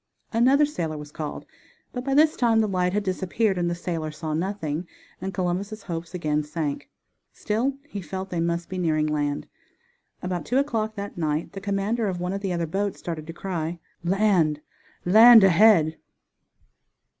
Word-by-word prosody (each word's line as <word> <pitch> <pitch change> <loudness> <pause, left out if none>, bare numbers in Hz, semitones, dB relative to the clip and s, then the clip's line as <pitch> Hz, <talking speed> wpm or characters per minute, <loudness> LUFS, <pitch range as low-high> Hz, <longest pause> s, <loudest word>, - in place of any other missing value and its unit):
Another 265 +6 +5
sailor 165 - -3
was 150 0 -9
called, 150 -1 -6 0.5
but 250 - -4
by 275 +1 0
this 310 +1 +5
time 230 -2 +3
the 220 - +2
light 180 -2 0
had 210 +2 0
disappeared 190 +2 0
and 175 -1 0
the 170 - -1
sailor 170 -3 -3
saw 155 0 -5
nothing, 170 -2 -2 0.3
and 190 +1 -3
Columbus' 190 +4 -3
hopes 170 0 -5
again 150 -3 0
sank. 150 -1 -4 0.4
Still 240 +6 -1
he 205 -8 -6
felt 190 +1 -6
they 175 - -1
must 170 0 -1
be 185 0 -5
nearing 155 -3 +1
land. 145 -1 -1 0.8
About 180 -3 -2
two 245 - 0
o'clock 225 -6 0
that 200 -3 -6
night 155 0 -1
the 195 - -7
commander 205 +3 -1
of 185 -2 -2
one 180 +1 -2
of 200 - -3
the 195 -2 -2
other 170 -1 -1
boats 195 +4 -2
started 160 -3 -6
the 165 - -6
cry: 170 -2 -3 0.3
"Land! 180 -5 +2 0.5
land 220 +4 +9
ahead!" 180 -4 +5
180 Hz, 170 wpm, -25 LUFS, 165-210 Hz, 0.8 s, land